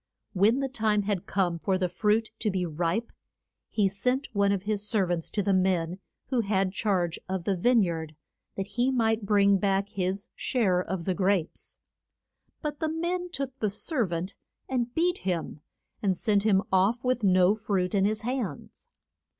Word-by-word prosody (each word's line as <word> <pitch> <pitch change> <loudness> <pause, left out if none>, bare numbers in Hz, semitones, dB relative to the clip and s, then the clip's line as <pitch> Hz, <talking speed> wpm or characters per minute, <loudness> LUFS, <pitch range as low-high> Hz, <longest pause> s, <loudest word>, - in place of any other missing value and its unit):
When 215 +7 +3
the 270 - 0
time 215 -5 +1
had 195 -3 -2
come 175 -4 0
for 185 +4 0
the 185 -1 0
fruit 215 +4 +1
to 215 - 0
be 185 -2 -1
ripe 170 +7 -1 0.6
he 205 -3 +2
sent 250 +8 -1
one 200 -1 +3
of 195 -2 -1
his 210 -1 -1
ser 210 -2 +2
vants 175 -2 -2
to 205 - -1
the 200 0 +2
men 185 -1 +1 0.3
who 255 -3 +2
had 195 -3 0
charge 185 -5 0
of 190 -2 -2
the 195 +2 0
vine 235 +5 +4
yard, 160 -3 -3 0.4
that 195 - -2
he 240 +6 0
might 225 -4 +1
bring 200 -1 +4
back 195 0 +1
his 190 +1 -2
share 200 -8 +1
of 180 -1 -4
the 185 - +1
grapes. 185 -3 -1 0.9
But 295 -1 -3
the 315 - 0
men 350 +3 -2
took 270 -5 -5
the 215 - +1
ser 240 - 0
vant 175 +2 -3 0.3
and 245 -2 -1
beat 355 +2 +1
him, 170 -5 -3 0.4
and 190 -3 +1
sent 210 -3 +2
him 195 -2 +4
off 195 +6 +2
with 255 -1 +1
no 185 0 +5
fruit 200 -3 -1
in 195 -1 +3
his 215 +1 0
hands. 235 - -5
200 Hz, 180 wpm, -27 LUFS, 185-230 Hz, 0.9 s, no